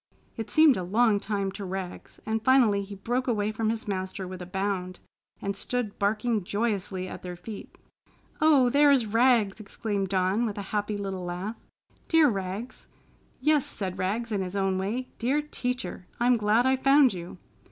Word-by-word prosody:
It 225 -3 -5
seemed 310 -4 +6
a 185 - -2
long 210 +3 +3
time 200 -2 -2
to 200 +1 -7
Rags, 190 -1 -6
and 220 0 -1
finally 240 -6 +4
he 200 0 -8
broke 245 +6 -2
away 215 -3 0
from 220 0 -1
his 225 +1 -3
master 190 -1 -3
with 185 0 -7
a 180 - -7
bound 190 -1 -3 0.4
and 200 0 -2
stood 235 0 -3
barking 215 +1 +1
joyously 200 -2 -2
at - - -8
their 180 -1 -6
feet. 205 +4 -9 0.6
"Oh, 295 -5 +5
there 290 +2 +5
is 270 -5 +4
Rags!" 225 -2 +3
exclaimed 200 -2 -3
Dawn, 190 +5 +1
with 210 - -5
a 200 - -3
happy 210 0 -1
little 195 -2 -4
laugh. 180 +5 -4 0.5
"Dear 325 -3 +6
Rags!" 195 +3 -5 0.5
"Yes!" 300 -3 +3
said 190 -3 -5
Rags 220 +5 -1
in 200 -2 0
his 185 +1 -4
own 195 -1 +1
way. 230 +7 -3
"Dear 260 +5 +1
Teacher! 250 -9 -4
I'm 245 +1 +4
glad 220 +2 +2
I 260 0 +3
found 275 -1 +5
you!" 175 0 -8
210 Hz, 175 wpm, -27 LUFS, 190-240 Hz, 0.6 s, seemed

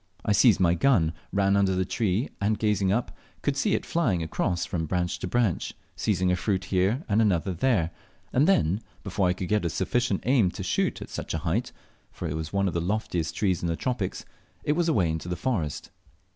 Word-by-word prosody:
I 110 - +1
seized 105 0 +5
my 85 -2 +4
gun, 85 -5 +3 0.2
ran 100 0 +2
under 95 -2 +3
the 95 0 +1
tree, 100 +4 0
and, 105 +1 +1
gazing 105 -3 +1
up, 120 +4 -1 0.3
could 145 - +1
see 195 +9 +2
it - - -3
flying 115 - +1
across 85 +2 -1
from 80 -2 -3
branch 90 +1 -1
to - - -3
branch, 115 -3 0 0.2
seizing 95 -3 +1
a - - +3
fruit 95 +1 -1
here 100 - +1
and 110 -1 +3
another 95 -3 +1
there, 90 -4 +1 0.4
and 140 +5 +4
then, 95 - +3 0.2
before 95 -2 0
I 90 - +2
could 90 0 -5
get 105 -2 +2
a 85 - 0
sufficient 100 +4 0
aim 120 -7 +4
to - - -5
shoot - - 0
at - - -13
such - - -4
a 80 +2 -4
height 110 +10 0 0.4
(for 85 - -5
it 75 - -3
was 80 0 -4
one 100 0 +1
of 90 - -2
the 85 - 0
loftiest 90 -3 -2
trees 95 -4 +1
of 85 - -1
the 85 - 0
tropics), 120 -3 -3 0.4
it - - +1
was 170 +2 +1
away 100 - +3
into 80 +2 -3
the 90 - -1
forest. 85 - -2
95 Hz, 215 wpm, -27 LUFS, 90-110 Hz, 0.4 s, seized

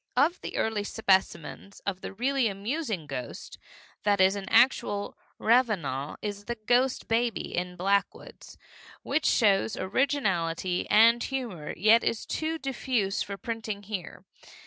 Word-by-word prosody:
Of 310 +7 +3
the - - -6
early 220 -2 0
specimens 195 -3 -1
of 190 -2 -4
the - - -6
really 255 +4 +1
amusing 215 - -3
ghost 135 -3 -7 0.4
that 205 -1 +2
is 190 +1 +5
an 195 -1 -6
actual 225 -4 +2 0.2
revenant 190 - +1
is 205 -1 -5
The 240 - -3
Ghost 245 +4 +1
Baby, 230 -1 -1
in 180 0 -3
Blackwood's, 195 +3 -2 0.5
which 310 - 0
shows 205 -2 +3
originality 185 - 0
and 230 +2 +6
humor, 235 - -4
yet 220 +5 +5
is 230 - -1
too 320 +1 -2
diffuse 255 -8 -1
for 200 0 -4
printing 220 -3 -5
here. 195 -5 -7
210 Hz, 130 wpm, -28 LUFS, 190-240 Hz, 0.5 s, and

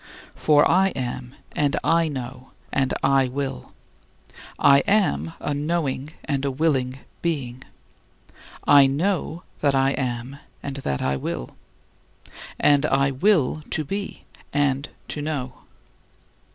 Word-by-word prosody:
For 150 -1 +4
I 190 +3 +4
am, 125 0 -4 0.2
and 145 -1 +1
I 165 0 +3
know, 130 -2 -7 0.2
and 135 -1 +1
I 135 -1 +4
will. 135 - -4 0.9
I 140 0 +6
am 80 - +2
a 145 - -2
knowing 150 -1 -2
and 140 -2 -1
a 140 - +1
willing 135 -3 0 0.2
being; 130 -7 -2 1.0
I 140 -1 +7
know 170 +3 -1 0.2
that 140 -2 +2
I 135 0 +3
am 125 +1 -3 0.2
and 140 -1 -5
that 70 - -2
I 70 +1 0
will; 60 - -4 1.1
and 145 -1 +4
I 140 0 +2
will 155 0 +2
to 155 - 0
be 195 +7 -5 0.3
and 145 -1 +1 0.2
to 150 - -4
know. 140 -4 -4
140 Hz, 125 wpm, -24 LUFS, 130-155 Hz, 1.1 s, I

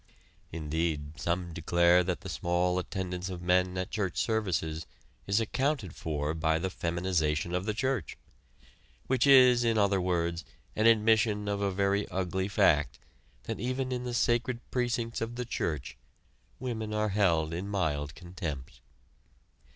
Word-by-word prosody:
Indeed 80 -1 -2
some 85 0 -2
declare 85 +2 +4
that 90 0 -2
the 100 - -8
small 90 +1 0
attendance 90 0 -4
of 90 -2 -6
men 90 +1 +2
at 90 +3 -3
church 95 -5 -2
services 85 -8 -1 0.4
is 100 +2 +3
accounted 120 - -1
for 75 -1 -2
by 80 0 +1
the 95 +3 -2
"feminization 85 -2 -1
of 90 +1 -1
the 110 - 0
church," 130 - -2 0.9
which 130 +1 +2
is, 125 -3 +7
in 115 -1 +2
other 100 -2 +3
words, 85 -2 -1 0.3
an 110 +1 +3
admission 110 -2 +3
of 100 0 -1
a 100 - +1
very 100 +1 +1
ugly 95 0 -1
fact 65 -10 +3 0.5
that - - -5
even 130 +1 -2
in 125 -1 -2
the 125 -1 -3
sacred 120 +1 +1
precincts 120 -2 -1
of 115 +1 -3
the 125 0 -3
church, 70 - -3 0.6
women 110 -4 -3
are 105 0 +1
held 85 -6 +2
in 90 +4 -4
mild 75 -7 -1
contempt. 75 -8 -7
95 Hz, 145 wpm, -30 LUFS, 85-110 Hz, 0.9 s, is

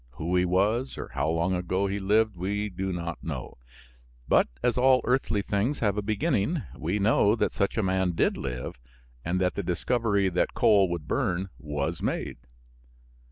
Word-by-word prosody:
Who 80 +8 -2
he 90 0 +3
was 105 +8 +1
or - - -6
how - - -1
long 85 +3 +1
ago 90 +2 0
he 100 +1 -2
lived 105 +2 +2
we 100 +4 -2
do 95 0 -3
not 85 -2 -5
know, 70 -7 -6 0.7
but - - +4 0.2
as 120 - +2
all 130 0 +4
earthly 125 -5 +1
things 105 +10 0
have 105 -4 +1
a 105 - -1
beginning, 110 - 0
we 85 +6 -2
know 105 +1 +3
that - - 0
such 100 +2 -1
a 110 - +2
man 95 -1 +1
did - - +1
live 60 -1 -5 0.4
and 90 +5 -1
that 90 -1 +1
the - - -2
discovery 100 +2 0
that 90 - 0
coal 100 -3 +4
would 85 -4 -4
burn 95 +2 -1
was 75 -2 -3
made. - - -2
95 Hz, 175 wpm, -27 LUFS, 90-105 Hz, 0.7 s, but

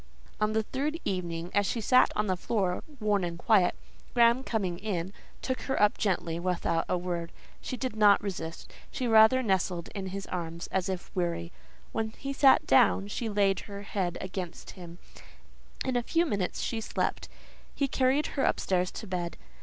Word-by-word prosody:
On 215 0 +1
the 220 0 +1
third 290 +8 -2
evening, 175 -2 -3
as 205 -1 +2
she 235 - -1
sat 255 +4 +4
on 210 - +1
the 185 -2 +1
floor, 185 -1 -1 0.2
worn 210 -3 +1
and 170 -1 -3
quiet, 190 -2 +3 0.4
Graham, 235 +2 +5
coming 190 -8 -2
in, 190 -3 -3 0.3
took 260 -1 -2
her 265 - +1
up 210 0 +4
gently, 170 -4 0
without 170 -2 0
a 180 - +2
word. 175 -1 -3 0.3
She 255 - -4
did 250 -1 -3
not 205 -2 +6
resist: 170 -5 -6 0.2
she 255 - -3
rather 225 +3 +6
nestled 185 -4 0
in 195 -2 -4
his 195 +1 -5
arms, 170 -1 -5
as 190 0 0
if 185 +1 -5
weary. 170 -1 -1 0.4
When 220 0 -3
he 275 0 -4
sat 275 -1 +5
down, 215 -5 +4
she 225 +2 -3
laid 200 -2 +2
her 200 -1 -8
head 185 -4 -2
against 185 -2 -6
him; 175 -2 -11 0.9
in 260 -1 -1
a 245 - +2
few 335 +8 +1
minutes 200 - -2
she 225 -2 -2
slept; - - -2 0.5
he 280 - +1
carried 265 +3 +2
her 275 - 0
upstairs 180 -1 +1
to 220 - -7
bed. 180 -3 -4
200 Hz, 175 wpm, -29 LUFS, 180-225 Hz, 0.9 s, not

